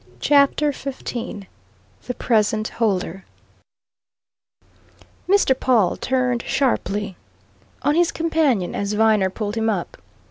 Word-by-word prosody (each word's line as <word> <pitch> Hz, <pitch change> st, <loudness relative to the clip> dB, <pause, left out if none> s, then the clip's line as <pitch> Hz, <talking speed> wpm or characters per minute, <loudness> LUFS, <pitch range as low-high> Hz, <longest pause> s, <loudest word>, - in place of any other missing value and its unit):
CHAPTER 290 Hz, +1 st, +3 dB
XV 250 Hz, -6 st, -6 dB, 0.6 s
THE -, -, -2 dB
PRESENT 215 Hz, -1 st, +1 dB
HOLDER 190 Hz, -4 st, -1 dB, 2.1 s
Mr. 385 Hz, -10 st, +3 dB
Pawle 225 Hz, -9 st, +2 dB
turned 250 Hz, -2 st, 0 dB
sharply 210 Hz, -8 st, -1 dB, 0.7 s
on 290 Hz, +2 st, +2 dB
his 340 Hz, +1 st, +2 dB
companion 315 Hz, -, 0 dB
as 200 Hz, +1 st, -2 dB
Viner 210 Hz, -3 st, +3 dB
pulled 205 Hz, +1 st, -4 dB
him 225 Hz, 0 st, +1 dB
up. 190 Hz, -5 st, -3 dB
230 Hz, 100 wpm, -21 LUFS, 205-275 Hz, 2.1 s, CHAPTER